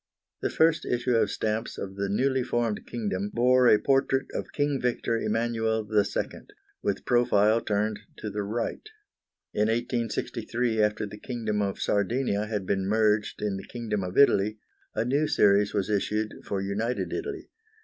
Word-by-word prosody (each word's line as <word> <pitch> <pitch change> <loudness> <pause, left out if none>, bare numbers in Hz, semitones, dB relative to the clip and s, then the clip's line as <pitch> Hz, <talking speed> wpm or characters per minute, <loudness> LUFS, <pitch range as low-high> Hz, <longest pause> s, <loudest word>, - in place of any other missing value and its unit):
The - - 0
first 160 0 +3
issue 125 +1 -1
of 110 -3 +3
stamps 110 +2 -2
of 95 0 -6
the 100 0 -2
newly 130 +6 +1
formed 120 -3 -1
kingdom 100 -4 -2
bore 125 +1 +4
a 110 - +7
portrait 135 +1 +2
of - - -4
King 145 -2 0
Victor 120 -1 0
Emmanuel 110 -1 0
II. 105 -1 +2 0.6
with - - -2
profile 115 -2 +3
turned 105 0 -1 0.2
to 105 - -5
the 105 - -2
right. 110 +4 -3 0.7
In 105 +1 +2
1863, 115 0 -1
after 105 0 +1
the 105 +1 -9
Kingdom 110 -4 -2
of 100 -1 -2
Sardinia 105 +1 0
had 105 -3 -3
been 95 0 0
merged 105 0 +1
in 100 -2 -1
the 95 - -9
Kingdom 110 -5 -3
of 90 0 -5
Italy, 105 -6 +4 0.4
a 115 - 0
new 140 +5 +1
series 100 -3 +4
was 100 -2 -1
issued 105 +1 -1
for 100 -1 -2
united 110 +5 -2
Italy. 400 0 -5
110 Hz, 160 wpm, -27 LUFS, 105-120 Hz, 0.7 s, a